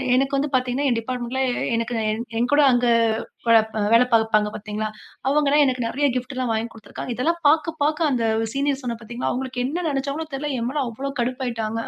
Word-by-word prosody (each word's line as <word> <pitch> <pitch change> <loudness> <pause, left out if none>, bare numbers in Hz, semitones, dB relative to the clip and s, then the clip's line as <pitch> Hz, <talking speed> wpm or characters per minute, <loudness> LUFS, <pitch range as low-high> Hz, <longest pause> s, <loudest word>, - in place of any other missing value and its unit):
எனக்கு 270 +2 +1
வந்து 290 +2 0
பார்த்தீங்கன்னா, 255 +2 +1
என் 240 - +2
டிப்பார்ட்மெண்ட்ல 250 +2 -3
எ - - -1 0.2
எனக்கு 230 +1 -2 0.5
என்கூட 250 +5 +3
அங்க 245 0 +2 0.6
வே 230 -1 +7 0.3
வேலை 235 +2 +6
பார்ப்பாங்க 220 -2 +3
பார்த்தீங்களா? 215 +1 -4 0.4
அவுங்க 295 +1 +2
எல்லாம் 295 +1 +5
எனக்கு 255 -3 0
நிறைய 285 +5 +1
கிப்ட் 255 +2 -3
எல்லாம் 255 -2 -1
வாங்கிக் 225 +1 -2
கொடுத்துருக்காங்க. 225 +2 -7
இதெல்லாம் 335 +8 0
பார்க்க 315 +1 +2
பார்க்க 305 +1 +2
அந்த 245 -3 0 0.3
சீனியர் 280 0 0
சொன்னேன் 235 -2 -4
பாத்தீங்களா, 235 +2 -4
அவுங்களுக்கு 255 -1 -3
என்ன 340 +5 -3
நினைச்சாங்களோ 280 +3 -2
தெரல, 295 +2 -3
என்மேல 265 +5 -1
அவ்ளோ 270 +5 -5
கடுப்பாயிட்டாங்க. 235 -3 -2
255 Hz, 175 wpm, -23 LUFS, 235-280 Hz, 0.6 s, வே